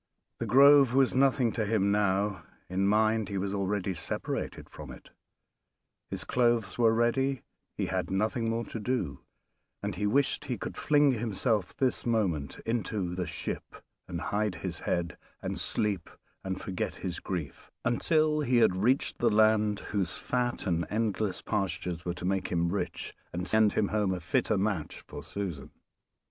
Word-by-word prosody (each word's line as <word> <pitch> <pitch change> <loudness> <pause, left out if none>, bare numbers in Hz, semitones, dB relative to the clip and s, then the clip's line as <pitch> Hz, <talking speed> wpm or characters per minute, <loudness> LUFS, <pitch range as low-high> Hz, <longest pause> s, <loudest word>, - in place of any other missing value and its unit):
"The - - -2
Grove" 140 -1 +7
was 135 -1 +4
nothing 130 -2 +3
to 110 - -1
him 100 -2 +2
now 100 -2 +1 0.3
in 95 +2 0
mind 110 0 +2
he 100 - -2
was 95 +1 -2
already 100 -1 -1
separated 85 - -4
from - - -10
it; - - -12 1.0
his - - -4
clothes 120 -5 +1
were 115 -2 +5
ready, 120 +3 +1 0.3
he - - -1
had - - -2
nothing 110 +4 0
more 115 +1 -1
to 115 - -6
do, 105 - -2 0.6
and 100 0 -2
he 105 +3 -1
wished 135 +6 +1
he - - -2
could - - -6
fling 145 -2 +4
himself 110 -3 -1
this 130 -2 +1
moment 95 - 0
into 105 -5 -1
the 90 -2 -2
ship 80 - -5 0.3
and 85 -2 -4
hide 105 -1 -1
his 85 -3 -3
head, 85 -1 -2 0.2
and - - -4
sleep 100 -5 -1 0.3
and 95 0 -3
forget 95 -2 -3
his 90 -2 -4
grief, 85 -7 -5 0.2
until 155 +4 +2
he 125 -5 +4
reached 110 +9 +1
the 120 - +4
land 110 -1 +3
whose 95 -4 -1
fat 125 -1 -1
and 85 -3 0
endless 105 -2 -1
pastures 90 -4 -2
were 90 -1 -2
to 90 - -6
make 95 +1 0
him 85 0 0
rich 100 - -3 0.2
and 90 +1 -4
send 110 -1 +4
him 100 - +1
home 105 -3 +1
a - - -5
fitter 110 +4 +1
match 95 -5 -2
for - - -9
Susan. 90 -9 -5
105 Hz, 160 wpm, -29 LUFS, 95-115 Hz, 1.0 s, Grove